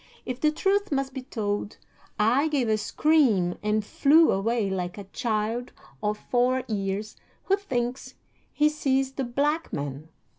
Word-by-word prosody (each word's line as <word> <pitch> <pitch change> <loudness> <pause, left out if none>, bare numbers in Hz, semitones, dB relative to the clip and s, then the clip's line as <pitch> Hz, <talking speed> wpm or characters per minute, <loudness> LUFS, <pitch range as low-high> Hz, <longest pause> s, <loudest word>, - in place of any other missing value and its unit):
If 250 0 -4
the 305 - +4
truth 395 +5 0
must 270 -1 -1
be 265 - -5
told, 210 -5 -3 0.4
I 245 +8 +3
gave 280 -6 0
a 215 - +3
scream 215 - +2
and 210 0 0
flew 310 +8 +5
away 215 +2 0
like 180 -1 -3
a 205 - -6
child 225 +3 -2 0.3
of 210 0 -1
four 250 +3 +1
years 205 0 -3 0.3
who 390 - +3
thinks 250 -11 -3 0.4
he 300 +1 +3
sees 270 -3 0
the 270 0 -3
Black 290 +6 -1
Man. 145 +2 -5
245 Hz, 150 wpm, -26 LUFS, 210-280 Hz, 0.4 s, flew